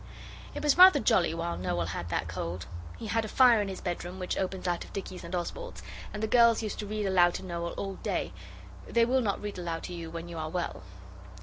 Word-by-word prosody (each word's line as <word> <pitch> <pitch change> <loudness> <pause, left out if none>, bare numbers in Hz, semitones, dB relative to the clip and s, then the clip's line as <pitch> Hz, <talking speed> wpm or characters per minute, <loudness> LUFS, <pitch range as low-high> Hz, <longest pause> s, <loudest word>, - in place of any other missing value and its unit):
It - - -4
was 295 +3 +3
rather 370 -5 +10
jolly 205 -10 +3
while 170 +1 -2
Noel 85 -1 -1
had 85 +1 -4
that - - -1
cold. 85 +1 -4 0.3
He - - -7
had 225 +1 0
a - - -4
fire 240 -1 +6
in 205 - -2
his 190 -1 -6
bedroom 175 +1 -4
which 185 -1 -2
opens 190 -1 -2
out 175 -1 0
of - - -14
Dicky's 190 -2 -6
and 170 +2 -4
Oswald's, - - -5 0.3
and 210 0 -5
the - - +2
girls 235 0 +5
used 215 - -4
to 210 - -4
read 210 0 -2
aloud 175 -2 +4
to - - -5
Noel 170 -1 -3
all 195 -1 -4
day; - - -2 0.5
they 235 0 +3
will 260 +2 +2
not 205 -4 0
read 205 -2 -5
aloud 165 -2 -3
to 180 - -6
you 170 -2 -6
when 165 +1 -6
you 170 -1 -6
are 155 0 -3
well. 175 +1 -3
185 Hz, 235 wpm, -29 LUFS, 170-220 Hz, 0.5 s, rather